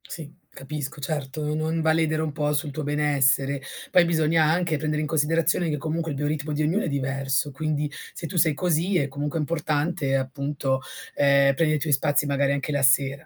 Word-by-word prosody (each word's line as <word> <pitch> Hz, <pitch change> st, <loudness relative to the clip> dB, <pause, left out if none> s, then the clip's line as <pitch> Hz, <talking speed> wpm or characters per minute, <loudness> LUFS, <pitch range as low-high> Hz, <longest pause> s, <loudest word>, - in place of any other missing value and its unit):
Sì, 155 Hz, -2 st, -8 dB, 0.2 s
capisco, 145 Hz, +1 st, -6 dB
certo. 150 Hz, 0 st, -3 dB
Non 160 Hz, +1 st, -1 dB
va 160 Hz, 0 st, +3 dB
a -, -, +3 dB
ledere 160 Hz, -1 st, +1 dB
un 160 Hz, -1 st, -2 dB
po' 150 Hz, 0 st, -1 dB
sul 145 Hz, +1 st, -1 dB
tuo 155 Hz, +2 st, -5 dB
benessere. 140 Hz, -2 st, +1 dB, 0.3 s
Poi 180 Hz, -, +6 dB
bisogna 160 Hz, -1 st, +2 dB
anche 165 Hz, +1 st, +1 dB
prendere 150 Hz, +1 st, -1 dB
in 155 Hz, -, -2 dB
considerazione 165 Hz, +2 st, +1 dB
che 150 Hz, -, -1 dB
comunque 160 Hz, +2 st, -3 dB
il 140 Hz, -, -4 dB
bioritmo 150 Hz, +1 st, -2 dB
di 150 Hz, +1 st, 0 dB
ognuno 175 Hz, +8 st, +1 dB
è -, -, -2 dB
diverso, 135 Hz, 0 st, -1 dB
quindi, 150 Hz, +1 st, -2 dB, 0.2 s
se 165 Hz, -, -6 dB
tu 185 Hz, -, -8 dB
sei 160 Hz, -2 st, +4 dB
così 175 Hz, +3 st, +1 dB
è 140 Hz, -, +1 dB
comunque 145 Hz, +3 st, -3 dB
importante 150 Hz, -1 st, -1 dB
appunto, 135 Hz, 0 st, -2 dB, 0.3 s
uhm, 140 Hz, -1 st, +4 dB
prende 155 Hz, 0 st, +2 dB
i -, -, -1 dB
tuoi 150 Hz, 0 st, 0 dB
spazi 145 Hz, +2 st, +2 dB
magari 140 Hz, -1 st, +1 dB
anche 140 Hz, +1 st, -2 dB
la 145 Hz, -1 st, 0 dB
sera. 140 Hz, +2 st, +3 dB
150 Hz, 200 wpm, -25 LUFS, 140-160 Hz, 0.3 s, Poi